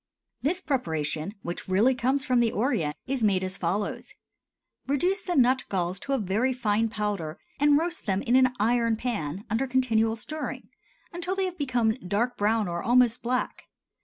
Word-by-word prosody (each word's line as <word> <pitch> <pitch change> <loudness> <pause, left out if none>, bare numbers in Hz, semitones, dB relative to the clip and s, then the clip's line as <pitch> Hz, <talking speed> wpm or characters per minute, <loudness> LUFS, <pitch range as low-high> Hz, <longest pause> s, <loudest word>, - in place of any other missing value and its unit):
This 350 +7 0
preparation, 160 - -2
which 175 - -5
really 205 +8 +4
comes 260 +2 0
from 255 -3 +3
the 235 -2 +3
Orient, 180 - 0
is 265 -3 -2
made 195 -3 +3
as 185 0 -3
follows: 195 +3 -3 0.7
Reduce 355 +9 +1
the 360 -3 -3
nut 260 -1 +4
galls 185 0 -1
to 275 - -3
a - - +3
very 220 +5 0
fine 225 -2 +1
powder 205 -7 -3 0.2
and 290 0 +5
roast 335 -4 -3
them 195 0 0
in 245 -1 +2
an 255 -1 +4
iron 230 +1 +2
pan 205 -7 -3
under 230 +6 0
continual 225 -4 +2
stirring 305 +7 -6 0.4
until 350 +2 -2
they 385 -1 0
have 365 -1 -4
become 245 -5 +2
dark 225 +5 -1
brown 215 0 +1
or 170 0 -3
almost 245 0 +3
black. 250 +2 -2
235 Hz, 170 wpm, -27 LUFS, 200-260 Hz, 0.7 s, and